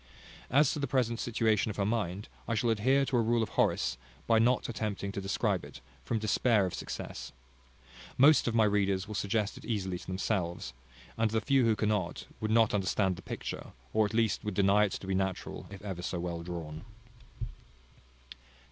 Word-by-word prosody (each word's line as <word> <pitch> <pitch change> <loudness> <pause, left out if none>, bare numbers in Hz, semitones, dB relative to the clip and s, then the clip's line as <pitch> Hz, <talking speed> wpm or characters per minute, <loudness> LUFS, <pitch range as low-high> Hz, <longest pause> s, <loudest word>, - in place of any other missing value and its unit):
As 140 +2 +4
to 150 - -3
the 140 - -1
present 120 -3 0
situation 110 -2 +1
of 105 - -4
her 100 - 0
mind, 105 -2 -1 0.2
I 115 - 0
shall 115 +2 +2
adhere 130 +6 +3
to 130 - 0
a - - +4
rule 115 0 +2
of - - -4
Horace, 65 -1 +1 0.3
by 115 -1 +4
not 120 +2 +3
attempting 105 -3 -3
to 100 - -4
describe 95 0 0
it, - - -10 0.2
from 115 - -1
despair 110 0 +2
of 90 - -4
success. - - -6 0.9
Most 145 +2 +6
of 115 - 0
my 115 - +5
readers 100 -2 +1
will 105 - -6
suggest 100 0 -1
it - - -13
easily 95 -5 -2
to - - -13
themselves; 95 - -2 0.5
and 115 -1 +3
the 110 +1 +1
few 130 +3 +3
who 115 -1 +3
cannot, 105 -4 -1
would 110 - -2
not 110 0 +4
understand 95 -1 +1
the - - -10
picture, - - -6 0.2
or 110 - +4
at 110 - -6
least 115 -3 +1
would 105 -2 -3
deny 100 +2 +4
it 100 - -3
to - - -6
be 95 - -1
natural, 95 -1 -2
if 100 0 -10
ever 95 -4 -5
so 90 0 -3
well 85 -1 -3
drawn. 85 -2 -6
105 Hz, 190 wpm, -31 LUFS, 95-115 Hz, 0.9 s, Most